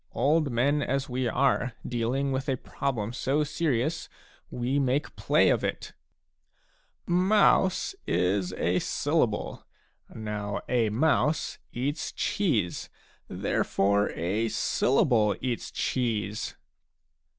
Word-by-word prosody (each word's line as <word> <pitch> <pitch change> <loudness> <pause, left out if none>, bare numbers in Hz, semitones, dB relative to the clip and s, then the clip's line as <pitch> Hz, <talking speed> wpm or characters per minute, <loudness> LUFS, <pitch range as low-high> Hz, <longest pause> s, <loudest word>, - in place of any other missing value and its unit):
Old 150 +1 +2
men 135 +5 +1
as 135 0 -1
we 125 0 -1
are, 125 0 +1
dealing 125 +3 -1
with 135 +1 -2
a 130 - +1
problem 120 -5 -3
so 140 +4 0
serious, 155 0 -1 0.4
we 125 +3 -1
make 135 +1 0
play - - +3
of - - +1
it! - - -3 1.1
Mouse 190 - +3
' - - -37 0.2
is 95 -1 0
a 90 0 +1
syllable.^ - - -1 0.5
Now 105 -2 -4
a 120 -3 +2
mouse 150 +5 +1
eats 140 +5 -3
cheese; 115 - -1 0.4
therefore, 100 +1 +1
a 100 +7 -1
syllable 115 -3 +2
eats 125 -2 -3
cheese." 110 -5 -2
125 Hz, 105 wpm, -27 LUFS, 110-145 Hz, 1.1 s, play